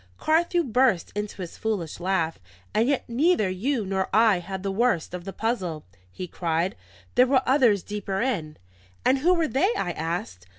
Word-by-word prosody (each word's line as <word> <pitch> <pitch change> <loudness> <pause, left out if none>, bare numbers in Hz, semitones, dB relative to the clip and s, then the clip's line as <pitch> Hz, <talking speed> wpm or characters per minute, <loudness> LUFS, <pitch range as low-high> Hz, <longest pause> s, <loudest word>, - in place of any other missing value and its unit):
Carthew 340 +2 +2
burst 250 - +2
into 205 -2 -4
his 170 - -9
foolish 195 -9 -2
laugh. 175 - 0 0.3
"And 225 +4 +2
yet 280 - 0
neither 240 - +2
you 225 +4 -1
nor 190 0 -1
I 215 -2 +4
had 190 +2 -6
the 195 - -1
worst 200 -6 +1
of 180 -1 -6
the 195 - -5
puzzle," 190 -8 -2 0.3
he 180 - -6
cried. 170 +3 -1 0.4
"There 250 +1 +5
were 260 0 +3
others 245 -8 +4
deeper 200 -2 -3
in." 180 -12 -2 0.5
"And 265 +1 +4
who 355 +6 +4
were 330 -2 +1
they?" 340 - +2
I 175 - -1
asked. 160 - -4
205 Hz, 175 wpm, -25 LUFS, 180-255 Hz, 0.5 s, There